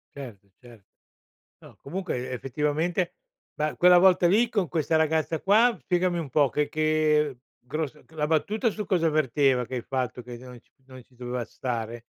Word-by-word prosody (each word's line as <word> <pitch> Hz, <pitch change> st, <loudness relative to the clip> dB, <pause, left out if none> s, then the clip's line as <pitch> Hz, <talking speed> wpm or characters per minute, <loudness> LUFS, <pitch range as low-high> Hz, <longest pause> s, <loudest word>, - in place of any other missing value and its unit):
Certo, 110 Hz, -8 st, -10 dB
certo. 120 Hz, -5 st, -17 dB, 0.8 s
No, -, -, -16 dB
comunque 140 Hz, -6 st, -4 dB
effettivamente, 150 Hz, -, -1 dB, 0.4 s
ma 150 Hz, 0 st, -2 dB
quella 180 Hz, 0 st, +6 dB
volta 180 Hz, -1 st, +5 dB
lì 220 Hz, +6 st, +3 dB
con 200 Hz, -7 st, 0 dB
questa 160 Hz, +2 st, -1 dB
ragazza 160 Hz, 0 st, +1 dB
qua, 225 Hz, +4 st, +4 dB
spiegami 175 Hz, +3 st, 0 dB
un 155 Hz, -4 st, -5 dB
po', 140 Hz, +1 st, +3 dB
che 150 Hz, +4 st, 0 dB
che 155 Hz, -2 st, +1 dB, 0.3 s
gros 150 Hz, +2 st, -3 dB, 0.2 s
la 150 Hz, -2 st, -2 dB
battuta 210 Hz, -, +1 dB
su 210 Hz, -1 st, -5 dB
cosa 165 Hz, -4 st, +1 dB
verteva? 135 Hz, -3 st, +2 dB
Che 130 Hz, -, -6 dB
hai 120 Hz, -, -2 dB
fatto 130 Hz, -2 st, -3 dB
che 120 Hz, 0 st, -9 dB
non 125 Hz, 0 st, -12 dB
c -, -, -36 dB, 0.2 s
non 130 Hz, -2 st, -13 dB
ci 125 Hz, -, -28 dB
doveva 125 Hz, -1 st, -4 dB
stare? 120 Hz, -2 st, -5 dB
150 Hz, 170 wpm, -26 LUFS, 125-175 Hz, 0.8 s, quella